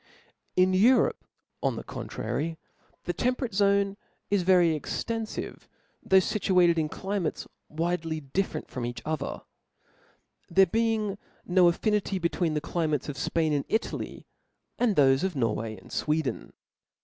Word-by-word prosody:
In 185 +1 +4
Europe, 230 +8 +4 0.4
on - - 0
the - - -6
contrary, 160 +2 -4 0.5
t|ie 175 - -1
temperate 250 0 -1
zone 200 0 +2 0.3
i^yery 180 -4 +4
extenfiv^^though 225 +8 -4 0.4
fituated 185 -3 +4
\n 155 -1 0
climates 190 -3 -3 0.2
widely 165 0 -2
different 155 +7 -3
from 125 - -5
each 120 +1 -5
other; 155 -3 -3 1.1
there 190 +2 +6
toeing 215 0 0 0.3
no 180 0 +5
affinity 205 +2 +1
between 170 -2 0
the 150 - 0
climates 155 -3 -1
of 145 - -4
Spain 160 +2 0
and 145 -1 -1
Itaiy, 220 - -3 0.5
and 235 -5 +2
thofe 135 -1 +4
of 190 -3 -1
Norway 115 -3 -1
and 95 - -15
Sweden. 150 -5 -1
175 Hz, 125 wpm, -28 LUFS, 155-200 Hz, 1.1 s, there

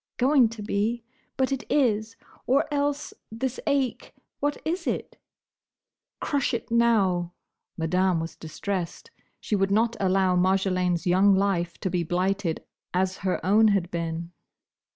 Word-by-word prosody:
"Going 260 -2 +4
to 220 -2 -8
be! 220 +3 -1 0.3
But 265 0 +1
it 270 -1 -2
is! 225 -5 +1 0.3
Or 270 +3 +3
else, 285 0 -1 0.2
this 255 +3 -3
ache? 275 -3 -1 0.2
What 290 +1 0
is 345 +4 -2
it?" - - -3 1.0
"Crush 275 -4 0
it 230 - -6
now!" 195 -7 +2 0.4
Madame 180 +2 +1
was 165 +1 -5
distressed. 185 - -5 0.3
She 215 - -1
would 195 -1 +1
not 225 +3 +2
allow 190 -1 +2
Marjolaine's 185 -1 +1
young 190 +2 +5
life 190 -3 0
to 190 - -1
be 180 -1 0
blighted 180 +1 -1 0.3
as 185 +1 +1
her 190 -2 -2
own 215 +4 +5
had 195 -4 +1
been. 170 0 -3
195 Hz, 135 wpm, -26 LUFS, 180-235 Hz, 1.0 s, young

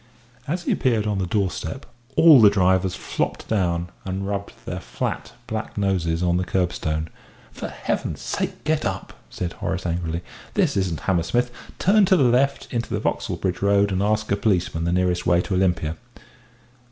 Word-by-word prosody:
As 175 +5 -2
he - - 0
appeared 115 -5 +1
on 105 -2 0
the 95 - -1
doorstep, 105 +6 -2 0.3
all 155 -6 +8
the 105 - +9
drivers 95 -1 +2
flopped - - -3
down 85 -4 0
and 95 +1 -3
rubbed 100 0 -3
their - - -4
flat, - - -4
black 110 -1 -5
noses 90 -4 0
on 90 0 +2
the 90 - 0
curbstone. 85 -4 -1 0.4
"For - - -6
Heaven's - - -3
sake - - -3
get 155 0 +1
up!" 95 -1 -3 0.2
said 90 -1 -4
Horace 95 -1 -3
angrily. 85 0 -2 0.3
"This - - +2
isn't 90 -6 -1
Hammersmith. 95 +8 +1 0.3
Turn 200 +2 +4
to 190 0 +4
the 140 - +4
left, 125 +3 +2
into 120 -1 -2
the - - 0
Vauxhall - - -1
Bridge 95 -2 -2
Road, 100 0 +3
and 95 0 0
ask 110 +1 0
a - - +4
policeman 90 -5 0
the 85 - +1
nearest 90 0 +1
way 85 -1 +4
to 95 - -4
Olympia." 90 -4 +1
95 Hz, 175 wpm, -23 LUFS, 90-110 Hz, 0.4 s, the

